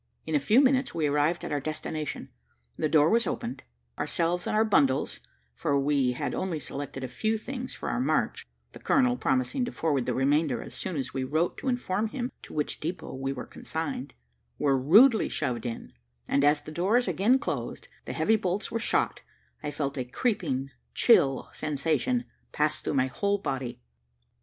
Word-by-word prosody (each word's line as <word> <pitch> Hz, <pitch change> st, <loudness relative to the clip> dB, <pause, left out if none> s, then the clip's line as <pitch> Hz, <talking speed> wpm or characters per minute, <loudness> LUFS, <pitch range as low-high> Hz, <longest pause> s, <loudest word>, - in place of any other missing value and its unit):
In 160 Hz, -, -4 dB
a 150 Hz, -, +4 dB
few 215 Hz, -, +5 dB
minutes 265 Hz, -5 st, +2 dB
we 160 Hz, -2 st, +1 dB
arrived 150 Hz, +4 st, +1 dB
at -, -, -5 dB
our 145 Hz, -, +1 dB
destination: 155 Hz, +1 st, -4 dB, 0.5 s
the 155 Hz, -, 0 dB
door 150 Hz, -1 st, +5 dB
was 230 Hz, +6 st, +3 dB
opened, 125 Hz, +3 st, -3 dB, 0.4 s
ourselves 175 Hz, +1 st, 0 dB
and -, -, 0 dB
our 220 Hz, +1 st, +4 dB
bundles 140 Hz, -11 st, +2 dB, 0.3 s
(for 140 Hz, -, 0 dB
we 140 Hz, -3 st, +2 dB
had -, -, -3 dB
only 180 Hz, -4 st, -2 dB
selected 140 Hz, -2 st, -6 dB
a -, -, -2 dB
few 215 Hz, -, -1 dB
things 250 Hz, +3 st, -6 dB
for -, -, -6 dB
our -, -, -1 dB
march, 140 Hz, -, 0 dB, 0.2 s
the -, -, -12 dB
colonel 125 Hz, -1 st, +3 dB
promising 130 Hz, -, 0 dB
to -, -, -5 dB
forward 145 Hz, -6 st, 0 dB
the 125 Hz, -, 0 dB
remainder 140 Hz, -1 st, +2 dB
as -, -, -10 dB
soon 175 Hz, -, -3 dB
as 130 Hz, -1 st, -3 dB
we 130 Hz, -1 st, -1 dB
wrote 155 Hz, +6 st, 0 dB
to -, -, -6 dB
inform 225 Hz, -4 st, 0 dB
him 245 Hz, +2 st, -4 dB
to -, -, -12 dB
which 150 Hz, -1 st, -2 dB
depot 170 Hz, +4 st, -5 dB
we 135 Hz, +1 st, -3 dB
were 125 Hz, -2 st, -5 dB
consigned) -, -, -5 dB, 0.4 s
were 140 Hz, -2 st, +2 dB
rudely 210 Hz, -, +6 dB
shoved 125 Hz, -4 st, -2 dB
in; 115 Hz, -, -6 dB, 0.3 s
and 140 Hz, -, +2 dB
as 145 Hz, +1 st, +4 dB
the 155 Hz, -, -8 dB
doors 200 Hz, +9 st, +2 dB
again 195 Hz, +9 st, +3 dB
closed, 285 Hz, -, -4 dB
and -, -, -26 dB
the -, -, -4 dB
heavy 220 Hz, -, +4 dB
bolts 195 Hz, +2 st, -2 dB
were 230 Hz, -, -1 dB
shot, -, -, 0 dB, 0.4 s
I -, -, -3 dB
felt 140 Hz, -2 st, -3 dB
a -, -, 0 dB
creeping, 135 Hz, -, -1 dB, 0.2 s
chill, 135 Hz, -, +4 dB
sensation 160 Hz, -, 0 dB, 0.3 s
pass 150 Hz, 0 st, 0 dB
through -, -, -2 dB
my 130 Hz, -1 st, +3 dB
whole 200 Hz, +10 st, 0 dB
body. 130 Hz, -8 st, -4 dB
150 Hz, 185 wpm, -28 LUFS, 135-205 Hz, 0.5 s, rudely